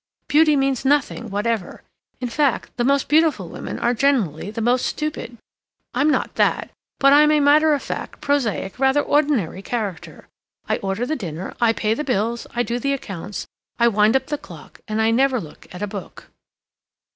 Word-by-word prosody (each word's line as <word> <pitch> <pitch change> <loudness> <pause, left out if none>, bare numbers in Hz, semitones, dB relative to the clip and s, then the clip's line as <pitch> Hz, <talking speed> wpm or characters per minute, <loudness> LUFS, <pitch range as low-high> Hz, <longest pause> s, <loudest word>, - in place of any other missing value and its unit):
Beauty 305 0 +4
means 270 -2 0
nothing 270 -4 +1
whatever. 205 -1 -2 0.4
In 250 - -3
fact, 275 +1 0
the 240 - 0
most 275 +2 +2
beautiful 295 - +2
women - - -6
are 240 +1 +1
generally 225 - +1
the 215 - -6
most 245 +2 +1
stupid. 300 -6 -4 0.6
I'm 295 - +2
not - - 0
that, - - +1 0.3
but 275 0 +5
I'm 300 +1 +6
a 305 - +4
matter 300 +2 +5
of 280 - -5
fact, - - -6
prosaic, 250 -8 -1
rather 270 +2 +3
ordinary 280 - +1
character; 205 -5 -5 0.4
I - - +1
order 195 +4 -2
the 310 - -1
dinner, 175 - -6
I 235 -1 +5
pay 220 -1 0
the 300 - -3
bills, 235 -2 -1
I 240 - +1
do 240 +1 -2
the 275 +3 0
accounts, 200 -6 -6 0.3
I 235 0 +4
wind 215 +2 +3
up 265 - +2
the 295 0 -3
clock, - - -13
and 215 0 -2
I 220 0 +3
never 260 +2 +2
look 155 -7 -12
at 180 +3 -6
a - - -1
book." 200 -1 -9
240 Hz, 180 wpm, -21 LUFS, 210-285 Hz, 0.6 s, I'm